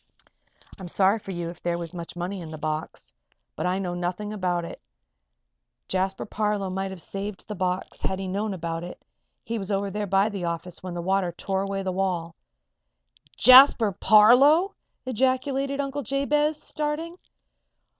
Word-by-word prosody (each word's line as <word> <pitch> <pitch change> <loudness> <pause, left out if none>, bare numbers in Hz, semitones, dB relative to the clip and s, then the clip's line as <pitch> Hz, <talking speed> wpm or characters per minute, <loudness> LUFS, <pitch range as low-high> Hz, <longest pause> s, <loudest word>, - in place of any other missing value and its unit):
"I'm 185 - -7
sorry 195 +4 +2
for 200 - -12
you 175 -2 -4
if 170 - -15
there 170 0 -1
was 170 0 -6
much 170 -1 -7
money 180 +2 -4
in 165 - -8
the 155 - -7
box. 155 - -5 0.4
But - - -2
I 180 +1 0
know 185 -2 -3
nothing 180 +4 -3
about 180 -4 -1
it. - - -9 1.1
Jasper 190 +1 -1
Parloe 210 -2 -1
might 190 +1 -2
have 190 -1 -8
saved 195 +3 -6
the 210 - -4
box 185 -1 -3
had 190 - -1
he 190 0 -4
known 205 +3 -2
about 165 -1 -4
it; 175 - -10 0.4
he 230 0 -3
was 195 +1 -4
over 200 0 -1
there 210 +1 -3
by 195 +2 +3
the 195 -4 -4
office 170 +1 -5
when 185 -1 -6
the 170 - -4
water 190 -1 +1
tore 190 +2 -2
away 195 0 -3
the 190 - -1
wall." 180 -3 -2 1.0
"Jasper 255 -3 +8
Parloe!" 250 - +6 0.3
ejaculated 265 +3 0
Uncle 280 0 -2
Jabez, 295 +4 0
starting. 310 +4 -4
195 Hz, 165 wpm, -25 LUFS, 180-225 Hz, 1.1 s, Jasper